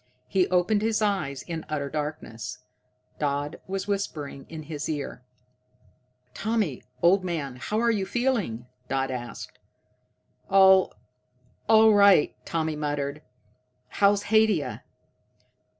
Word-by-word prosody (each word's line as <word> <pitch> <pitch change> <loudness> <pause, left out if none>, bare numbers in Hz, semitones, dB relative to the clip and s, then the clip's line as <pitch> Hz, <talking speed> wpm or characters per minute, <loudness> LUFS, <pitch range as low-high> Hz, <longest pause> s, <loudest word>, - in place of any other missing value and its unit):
He 190 -2 +2
opened 185 +4 +2
his 220 0 +1
eyes 190 -11 -1
in 165 -2 -5
utter 145 -2 -2
darkness. 145 -6 -5 0.6
Dodd 145 +1 -2
was 195 +1 -3
whispering 155 -9 -4
in 160 -1 -7
his 150 0 -5
ear. 145 -5 -4 1.1
"Tommy, 215 - -1 0.2
old 185 +3 +5
man, 150 -8 -3
how 210 +12 -2
are 235 0 +3
you 200 -4 -1
feeling 230 - -1
now?" - - -21 0.4
Dodd 135 - -6
asked. 120 -2 -7 0.9
"All 190 -1 +6 0.8
right," 205 -6 +6
Tommy 160 -1 -1
muttered. 145 -1 -3 0.7
"How's 200 0 +3
Haidia?" 215 -7 +2
170 Hz, 110 wpm, -26 LUFS, 145-205 Hz, 1.1 s, All